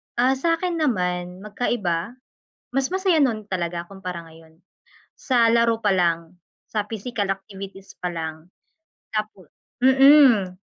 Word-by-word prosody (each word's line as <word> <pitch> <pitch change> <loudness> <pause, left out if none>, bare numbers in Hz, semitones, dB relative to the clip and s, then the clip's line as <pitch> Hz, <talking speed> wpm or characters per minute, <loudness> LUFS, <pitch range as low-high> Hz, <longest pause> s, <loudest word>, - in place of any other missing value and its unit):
Ah, 255 +2 +3
sa'kin 335 +2 0
naman 180 - -1
magkaiba, 210 -3 -2 0.6
mas 270 +4 0
masaya 375 -5 +2
no'n 215 -5 -1
talaga 175 -2 -3
kumpara 180 -4 -7
ngayon, 160 0 -18 0.6
sa 245 -4 +2
laro 230 -1 +3
pa 205 -3 +1
lang, 170 -1 0 0.3
sa 215 - -2
physical 215 -2 -3
activities 195 0 -8
pa 180 - -1
lang. 160 0 -6 0.7
Tapo 215 -5 -4 0.4
mm, 260 -8 +5
200 Hz, 120 wpm, -23 LUFS, 180-245 Hz, 0.7 s, mm